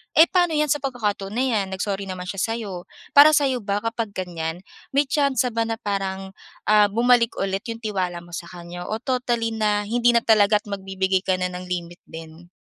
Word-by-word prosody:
Eh, 320 - +8
paano 350 -4 +2
'yan, 300 -2 +1
sa 295 - +2
pagkakataon 210 -7 -3
na 255 - +1
'yan, 220 -6 +1
nag-sorry 195 +1 -3
naman 185 -1 -5
siya 195 - -4 0.2
sa'yo, 195 -6 -6 0.2
para 290 +2 +8
sa'yo 270 -4 +2
ba, 205 -1 -2
kapag 230 -2 -3
ganiyan, 170 -1 -4 0.3
may 285 - +5
tsansa 270 -3 +1
ba 230 0 0
na 225 - -1
parang, 195 -2 -3 0.4
ah, 210 -1 +6
bumalik 235 +1 +3
ulit 195 0 -2
'yong 230 0 -6
tiwala 185 -5 -2
mo 175 - -16
sa 170 0 -6
kaniya 175 0 -9
o 215 - -2
totally 240 -3 -1
na, 210 -2 0
hindi 240 +3 +2
na 235 - +3
talaga't 210 -1 +3
magbibigay 190 -1 -1
ka 185 0 0
na 180 0 -2
ng 180 0 -7
limit 175 -1 -5
din? 165 +1 -11
205 Hz, 195 wpm, -23 LUFS, 185-235 Hz, 0.4 s, Eh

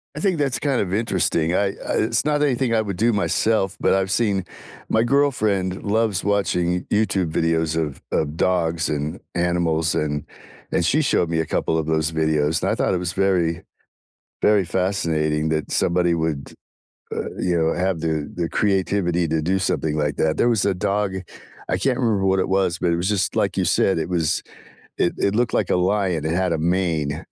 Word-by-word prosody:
I - - -5
think 190 -5 +1
that's 140 -3 0
kind 140 -4 0
of 95 -1 -3
interesting. 90 -6 0
I 100 - +2 0.2
I - - -2
it's 115 +1 +1
not 150 -1 +1
anything 130 -4 +1
I 110 - +3
would 100 -4 -4
do 115 +2 +3
myself, 100 -1 +1
but - - +2
I've 95 0 0
seen 100 -6 +1 0.4
my 110 +1 +3
girlfriend 110 -9 +1
loves 105 -2 0
watching 95 -4 +1 0.2
Y - - +3
YouTube 95 -6 0
videos 80 -1 0
of 75 -4 -2
of 75 0 -1
dogs 85 -3 +1
and 75 0 -3 0.2
animals, 85 -2 +1
and 75 -1 -1 0.5
and 85 - +1
she 155 - +3
showed 90 - +1
me 80 - 0
a 80 - 0
couple 80 - -1
of 80 - -1
those 80 0 0
videos, 80 -1 +1
and - - +1
I - - +1
thought - - 0
it - - +1
was 90 0 -3
very 90 -4 +1 0.8
very 105 -3 +4
fascinating 80 -4 0
that 80 -1 -2
somebody 85 0 +2
would, 80 -4 -2 0.6
uh, - - -3
you 90 -1 +1
know, 80 0 +2
have 90 -1 -1
the 80 -2 -2
the 85 -2 -2
creativity 95 -4 0
to 80 0 0
do 95 +4 0
something 80 -4 -1
like 75 -1 0
that. 80 -1 +1
There 120 - +3
was 110 -4 +1
a 100 - +2
dog, 100 0 -1 0.5
I 90 - +1
can't 125 +7 0
remember 110 -6 +1
what 95 0 +2
it - - 0
was, 95 -3 +1
but 85 - +1
it - - +2
was 90 +3 -1
just 105 -3 0
like - - 0
you - - +1
said, 95 - +2
it 80 - -2
was 85 -4 0 0.6
it 85 - +1
it 100 - +1
looked 120 0 +1
like - - +1
a - - +3
lion, 90 -4 0
it 80 - 0
had 90 0 0
a - - 0
mane, 80 -4 -1
90 Hz, 200 wpm, -22 LUFS, 80-100 Hz, 0.8 s, very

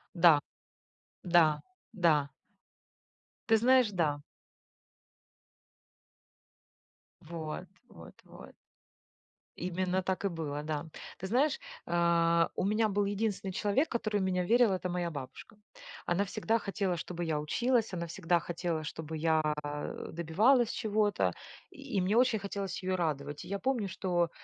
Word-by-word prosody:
Да. 165 -4 +7 0.8
Да, 165 -4 +4 0.3
да. 155 - +2 1.2
Ты 225 - +5
знаешь, 250 0 +5
да. 150 -5 0 3.0
Вот, 160 -1 -6 0.2
вот, - - -13
вот. - - -13 1.0
Именно 185 +1 -1
так 190 +1 -2
и - - +4
было, 150 -4 -4
да. 150 0 -3 0.3
Ты 190 - -6
знаешь, 285 - +2 0.3
э, 170 -1 +3
у - - -1
меня 215 +1 +2
был 200 0 +1
единственный 200 -1 -2
человек, 210 - +1
который 215 -3 -1
в 190 - 0
меня 180 -1 0
верил, 235 0 +4
это 185 -1 -1
моя 175 -1 -1
бабушка. 145 +8 -9 0.5
Она 190 +4 +1
всегда 225 +3 0
хотела, 195 -3 -1
чтобы 175 +1 -5
я 155 -2 0
училась, 235 - +1
она 170 -1 -2
всегда 170 0 0
хотела, 170 -1 -3
чтобы 160 +1 -6
я, 160 0 +2 0.2
э, 145 0 -5
добивалась 215 - +3
чего-то, 210 -2 +1 0.4
и 275 -8 -4
мне 195 +4 +1
очень 240 -3 +4
хотелось 195 -2 -4
её 185 0 0
радовать. 145 -4 -3
И - - -10
я 200 +1 -2
помню, 250 -6 0
что 175 -2 0
180 Hz, 130 wpm, -31 LUFS, 165-210 Hz, 3.0 s, Да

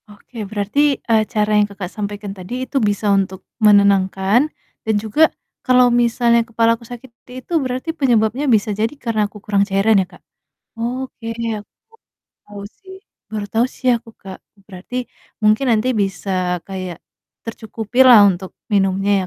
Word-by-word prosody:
Oke, 210 +1 -9
berarti, 240 +8 +1
eee, 220 -1 +4
cara 210 -2 0
yang 205 0 +3
Kakak, 195 -3 -7
sampaikan 205 -1 -5
tadi 205 +7 -6
itu 270 +1 -1
bisa 205 -1 +1
untuk 190 -1 -1 0.2
menenangkan 200 +4 +4 0.3
dan 220 -1 -1
juga 220 +10 +3 0.3
kalau 250 -1 +4
misalnya 235 0 +3
kepalaku 230 0 +1
sakit 245 0 -10
seperti 250 +1 -18
itu - - -8
berarti 255 +3 -4
penyebabnya 255 -2 +1
bisa 215 -2 +2
jadi 215 +3 0
karena 220 -5 -1
aku 210 - -13
kurang 200 -1 +1
cairan 200 +1 +3
ya, 185 - -4
Kak, 180 - -18 0.6
oke 245 0 -5 0.3
aku 205 - -18 0.3
baru - - -72 0.4
tahu 200 - -7
sih 380 - -14 0.3
baru 210 -2 -4
tahu 230 +2 +2
sih 255 - -4
aku, 230 0 -12
Kak. 190 -1 -11 0.3
Berarti 195 +5 -9 0.5
mungkin 215 +5 +3
nanti 225 +2 +2
bisa 190 -3 -1
kayak 185 -3 -6 0.5
tercukupi 225 +2 -1
lah 235 -5 +9
untuk 190 -1 -2 0.2
minumnya 195 0 +1
215 Hz, 155 wpm, -19 LUFS, 200-240 Hz, 0.6 s, lah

